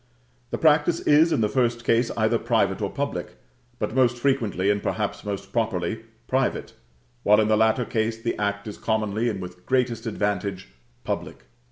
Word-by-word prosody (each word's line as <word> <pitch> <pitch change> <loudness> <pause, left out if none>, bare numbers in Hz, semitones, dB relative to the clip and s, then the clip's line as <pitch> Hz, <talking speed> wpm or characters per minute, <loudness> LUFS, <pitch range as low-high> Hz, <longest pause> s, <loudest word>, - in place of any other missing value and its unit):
The - - -2
practice 160 +2 +3
is, 155 +3 +5
in 130 - +2
the 105 - +3
first 120 0 0
case, 115 +1 +2
either - - +2
private - - +1
or - - -1
public; - - -4 0.4
but - - -3
most 125 -2 +3
frequently, 115 -7 +1
and 100 0 -1
perhaps - - -2
most 100 -1 -5
properly, 110 -3 -1 0.3
private; 130 0 -1 0.5
while, 105 -1 +5
in 110 0 +2
the 110 - +5
latter 110 +3 +2
case, 110 0 -1
the 115 +1 -2
act 100 0 -2
is 105 - -7
commonly, 110 +1 0
and 105 -4 -3
with 90 -1 -9
greatest 125 -3 0
advantage, 100 -3 -2 0.3
public. - - -4
110 Hz, 170 wpm, -24 LUFS, 105-120 Hz, 0.5 s, is